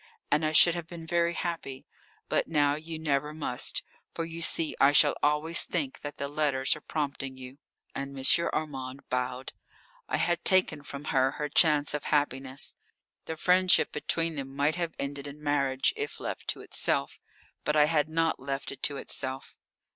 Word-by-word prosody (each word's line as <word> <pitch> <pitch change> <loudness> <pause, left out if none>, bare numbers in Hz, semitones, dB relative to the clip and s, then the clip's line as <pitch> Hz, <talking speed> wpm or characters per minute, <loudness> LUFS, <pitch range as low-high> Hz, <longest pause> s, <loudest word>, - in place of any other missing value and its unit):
And 150 +2 +3
I 155 - +1
should 165 +2 +7
have 170 -1 -5
been 165 -1 -9
very 170 +1 +1
happy. 160 -6 -4 0.4
But - - 0
now 145 -3 +2
you 160 +2 -5
never 150 -1 -1
must. 135 -5 +1 0.3
For 165 - -2
you 165 0 -7
see 160 -1 +2
I 140 +1 +6
shall 145 0 +6
always 150 +3 +2
think 150 -7 -3
that 145 0 -7
the 140 - -3
letters 140 -2 +1
are 150 - -11
prompting 140 -3 -4
you." 130 +2 -11 0.3
And 140 0 -5
M. 135 +5 +5
Armand 135 -3 -5
bowed. 125 +1 -3 0.6
I - - +1
had 175 0 0
taken 185 -5 +3
from 140 0 -8
her 135 0 +3
her 150 0 -4
chance 150 -2 +4
of 150 -1 -3
happiness. 135 -2 -1 0.5
The 160 - -4
friendship 180 +3 +3
between 165 +1 -1
them 135 0 -6
might 145 +2 +2
have 170 -1 -3
ended 140 0 -5
in 145 +1 -9
marriage 140 -2 +1
if 435 0 -5
left - - -5
to - - -1
itself. - - -1 0.4
But 150 - 0
I 150 -1 +6
had 155 -1 +1
not 165 0 0
left 135 +1 -4
it 140 - -10
to 145 - +1
itself. 130 -1 -4
150 Hz, 175 wpm, -28 LUFS, 135-160 Hz, 0.6 s, should